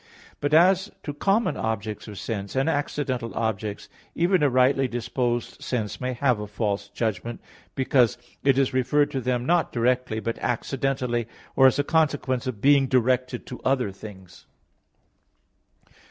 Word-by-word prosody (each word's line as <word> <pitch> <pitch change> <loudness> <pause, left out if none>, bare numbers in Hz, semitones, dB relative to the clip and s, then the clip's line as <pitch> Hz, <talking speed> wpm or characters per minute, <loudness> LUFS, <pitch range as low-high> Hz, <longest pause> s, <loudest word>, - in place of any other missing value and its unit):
But 145 - -1
as 185 +5 +5
to 145 - -4
common 200 +9 +1
objects 110 -1 -3
of 105 -2 -8
sense, 100 -1 -5
and 135 +2 +1
accidental 135 -7 -2
objects, 110 -2 -3 0.3
even 175 +1 +2
a 145 - +4
rightly 130 +1 +3
disposed 120 0 -2
sense 110 -3 -3
may 130 0 -1
have 125 -2 +1
a 105 - -5
false 100 -1 -2
judgment, 115 +2 -3 0.4
because 130 -3 +3 0.3
it 135 -2 +4
is 135 -1 +2
referred 145 +3 +2
to 135 -3 -2
them 125 0 -1
not 175 +2 +2
directly, 125 -1 0
but 115 +1 -4
accidentally, 125 -1 -1 0.3
or 135 - +7
as 130 - +2
a 145 - +2
consequence 145 -5 0
of 115 -6 -4
being 140 -1 +5
directed 125 0 +1
to 125 - -8
other 130 -6 +1
things. 95 -3 -12
125 Hz, 150 wpm, -25 LUFS, 115-140 Hz, 0.4 s, or